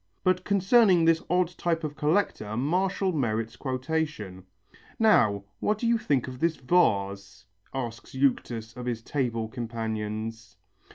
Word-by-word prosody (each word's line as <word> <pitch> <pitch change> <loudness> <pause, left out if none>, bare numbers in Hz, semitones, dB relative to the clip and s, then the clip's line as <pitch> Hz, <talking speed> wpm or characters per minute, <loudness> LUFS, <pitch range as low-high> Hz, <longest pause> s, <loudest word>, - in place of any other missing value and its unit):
But 185 0 +2
concerning 195 -2 +4
this 165 0 +4
odd 180 -1 +2
type 165 -1 0
of 150 -1 -4
collector 150 - 0
Martial 185 +7 +1
merits 115 -6 -1
quotation. 130 - -3 0.5
"Now, 110 - +4 0.2
what 210 - +1
do 235 - -3
you 230 0 +3
think 140 - 0
of 130 -1 -7
this 165 +1 +1
vase?" 100 - 0 0.3
asks 125 -1 -6
Euctus 120 -4 0
of 125 -1 -6
his 115 -2 -3
table 115 -6 -1
companions. 110 -3 -5
130 Hz, 130 wpm, -27 LUFS, 110-170 Hz, 0.5 s, concerning